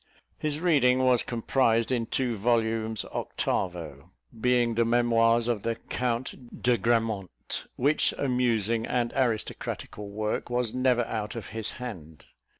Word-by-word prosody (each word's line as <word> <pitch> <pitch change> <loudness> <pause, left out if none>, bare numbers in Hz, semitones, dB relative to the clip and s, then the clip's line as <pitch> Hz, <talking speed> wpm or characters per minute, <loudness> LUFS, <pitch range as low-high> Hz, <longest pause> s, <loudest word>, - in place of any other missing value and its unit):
His 150 -1 -1
reading 130 -7 +3
was 125 -2 +4
comprised 115 0 +1
in 120 -3 0
two 125 -3 0
volumes 110 0 0
octavo, 80 -7 -3 0.3
being 120 -1 +3
the 115 +1 +2
Memoirs 115 0 +3
of 115 -4 0
the 115 +1 -1
Count 125 0 -4
de 125 0 +4
Grammont, 110 -4 -1
which 145 +4 +3
amusing 115 -4 +1
and 120 -1 0
aristocratical 110 -4 -2
work 105 +3 -2
was 120 -2 0
never 125 -1 +2
out 105 -1 -4
of 115 -4 -6
his 110 +1 -3
hand. 85 - -8
115 Hz, 130 wpm, -27 LUFS, 110-125 Hz, 0.3 s, was